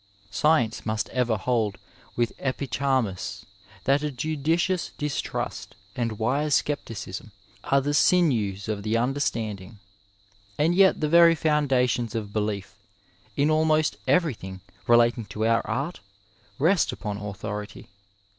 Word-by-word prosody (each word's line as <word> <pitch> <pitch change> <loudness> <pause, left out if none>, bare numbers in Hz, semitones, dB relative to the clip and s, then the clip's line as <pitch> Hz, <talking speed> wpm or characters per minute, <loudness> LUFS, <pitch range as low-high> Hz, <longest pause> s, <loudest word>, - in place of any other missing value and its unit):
Science 120 0 +2
must 110 0 -2
ever 120 -3 0
hold 110 -1 0 0.4
with 120 -1 0
Epicharmus 130 -7 -2 0.4
that 140 +2 +3
a 150 - -1
judicious 160 +6 -1
distrost 150 -1 -4 0.2
and 115 -3 -2
wise 140 +7 +1
scepticism 115 -8 -3 0.3
are 140 0 +3
the 145 +2 -1
sinews 115 - +2
of 105 -2 -2
the 110 +2 0
understanding. 115 -6 -2 0.8
And 160 +4 +2
yet 190 -1 +4
the 155 - +2
very 170 +1 +6
foundations 130 -7 +1
of 105 -3 -4
belief 105 -2 -2 0.6
in 145 +2 +3
almost 155 0 +2
everything 110 - 0 0.3
relating 120 -1 +4
to 110 +2 -3
our 115 0 +3
art 140 +10 -3 0.6
rest 170 +6 +3
upon 105 -3 -5
authority. 105 0 -6
125 Hz, 120 wpm, -25 LUFS, 110-150 Hz, 0.8 s, very